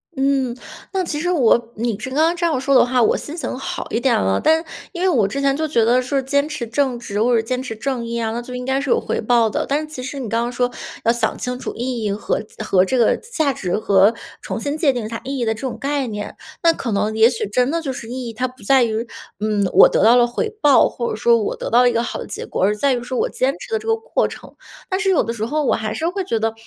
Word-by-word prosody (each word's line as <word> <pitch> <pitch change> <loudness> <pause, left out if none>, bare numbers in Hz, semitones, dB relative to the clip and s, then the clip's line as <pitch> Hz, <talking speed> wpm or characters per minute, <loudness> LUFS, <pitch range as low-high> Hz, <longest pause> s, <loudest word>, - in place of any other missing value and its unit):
嗯， 270 -3 +1 0.4
那 380 -1 0
其 310 -4 -3
实 355 +3 -1
我 235 -7 +3
你 225 -1 -2
是 265 - -5
刚 265 - -4
刚 325 +2 +3
这 345 - -5
样 315 -6 +1
说 275 +1 0
的 - - +7
话， 250 -1 +2
我 - - +3
心 300 - -5
情 320 - -3
好 - - -4
一 - - 0
点 250 0 +2
了， 95 0 +1
但 320 +1 +3 0.3
因 350 - -5
为 - - +3
我 235 - +3
之 275 - -4
前 275 -1 +2
就 315 +2 -1
觉 235 -7 +2
得 245 +2 +3
是 265 +2 -1
坚 280 +2 +1
持 300 -6 -4
正 250 +2 0
直 210 -3 -3
或 240 +2 +3
者 225 - +3
坚 250 +3 -3
持 255 -4 -6
正 255 +1 -3
义 235 0 -3
啊， 225 -1 -1
那 235 +2 -3
就 250 +1 -8
应 250 0 -5
该 265 +1 0
是 280 - -4
有 - - +3
回 - - -3
报 230 0 +3
的， - - -2
但 285 +2 +1
是 310 - -4
其 305 -4 -7
实 275 +2 -5
你 250 - -4
刚 230 +2 0
刚 240 +1 -2
说 245 0 0 0.3
要 230 - +4
想 240 0 -1
清 250 0 -4
楚 - - -4
意 245 -1 -3
义 210 - 0
和 205 +2 -2 0.2
和 190 -3 +3
这 255 +7 0
个 235 - +4
价 315 - -1
值 185 -6 -2
和 200 -1 +4 0.3
重 - - -4
新 285 +1 -2
界 310 -3 +3
定 240 -4 -4
它 230 +1 -6
意 275 +1 -4
义 240 - -1
的 220 - +1
这 220 - -11
种 260 -3 -4
概 280 -1 -1
念， 210 -2 -6 0.3
那 335 0 +5
可 245 -7 -4
能 210 +2 0
也 220 +1 +6
许 245 - -2
真 250 +5 +1
的 335 +3 0
就 275 -5 -3
是 235 - -8
意 250 0 -5
义， - - -8
它 250 +3 -1
不 255 +1 -16
在 270 -2 +4
于， 225 0 -1 0.3
嗯， 210 -2 0
我 - - +9
得 - - +1
到 230 +3 +7
了 245 -1 +5
回 240 - -2
报， 285 -2 +5
或 235 - -3
者 - - -2
说 235 +2 +4
我 215 - -2
得 - - -5
到 240 +2 +5
了 245 - +5
一 - - -5
个 230 - +1
好 235 - -4
的 - - -6
结 205 - -6
果。 - - -2
而 205 +2 +3
在 270 +5 +2
于 240 -1 -2
说 250 0 -3
我 - - +1
坚 265 +2 0
持 - - -10
的 450 - +2
这 440 - -9
个 450 - +3
过 445 - -1
程。 - - -12 0.3
但 375 - 0
是 400 -1 +1
有 360 - +3
的 230 - -3
时 220 -2 -3
候 300 +6 -1
我 - - +3
还 215 0 -3
是 320 - -2
会 385 +2 -3
觉 230 -11 -1
得， 225 0 0
250 Hz, 320 characters per minute, -20 LUFS, 225-280 Hz, 0.4 s, 我